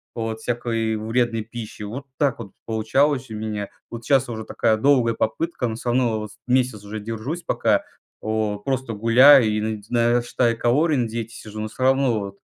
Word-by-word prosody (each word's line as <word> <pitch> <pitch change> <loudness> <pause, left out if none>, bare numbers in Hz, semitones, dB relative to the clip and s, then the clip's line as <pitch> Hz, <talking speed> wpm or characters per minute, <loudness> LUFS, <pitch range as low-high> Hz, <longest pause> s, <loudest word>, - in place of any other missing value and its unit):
вот 115 -1 -3
всякой 115 -2 -1
вредной 115 +1 0
пищи. 115 -2 -8
Вот 120 +7 -6
так 140 -5 +2
вот 100 -4 -8 0.2
получалось 125 +4 +1
у - - -5
меня. 105 -2 -4 0.2
Вот 115 -1 -8
щас 135 -3 +3
уже 110 -1 -5
такая 110 - +1
долгая 125 -3 +3
попытка, 130 +2 -1
но 110 - -3
всё 120 +1 -4
равно, 120 -3 +1
вот, 105 -1 -6 0.2
месяц 125 -4 +1
уже 105 +1 -5
держусь, 115 +10 -5
пока, - - +1 0.4
о 110 -1 -1
просто 130 0 -2
гуляю 120 +4 +7
и 105 - 0
наде 110 0 -2
и - - -9
на 120 +1 +3
считаю 120 -1 0
калории, 145 +6 +2
на 120 -2 +1
диете 115 0 -5
сижу, 110 0 -9
но 110 - -2
все 125 - -11
равно 130 -4 +3
вот 100 0 -7
115 Hz, 190 wpm, -23 LUFS, 110-125 Hz, 0.4 s, гуляю